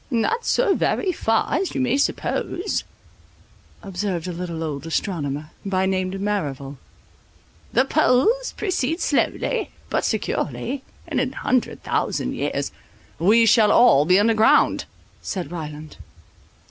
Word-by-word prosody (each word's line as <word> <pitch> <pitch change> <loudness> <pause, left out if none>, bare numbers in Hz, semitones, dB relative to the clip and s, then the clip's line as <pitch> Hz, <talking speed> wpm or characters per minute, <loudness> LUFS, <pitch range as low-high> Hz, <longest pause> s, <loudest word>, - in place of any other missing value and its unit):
"Not 290 - 0
so 475 -6 +3
far 265 - 0
as 385 - -1
you - - 0
may 255 0 +1
suppose," 355 +6 -1 1.0
observed 185 -3 -3
a 180 - -3
little 170 -2 -4
old 150 -1 -4
astronomer, 155 -4 -3
by 190 -1 0
name 185 -1 0
Merrival, 150 -9 -3 0.9
"the 260 +3 +3
poles 315 - +2
precede 345 -6 -1
slowly, - - 0 0.2
but - - +1
securely; 270 +1 -2 0.3
in 300 -6 -1
an 260 +1 -1
hundred 255 -2 -1
thousand - - -1
years—" - - -2 0.5
"We 220 +7 +5
shall 215 -1 +5
all 190 - +6
be 180 +3 +5
underground," 220 +1 +4 0.4
said 180 -6 -4
Ryland. 155 -2 -7
205 Hz, 120 wpm, -22 LUFS, 170-260 Hz, 1.0 s, all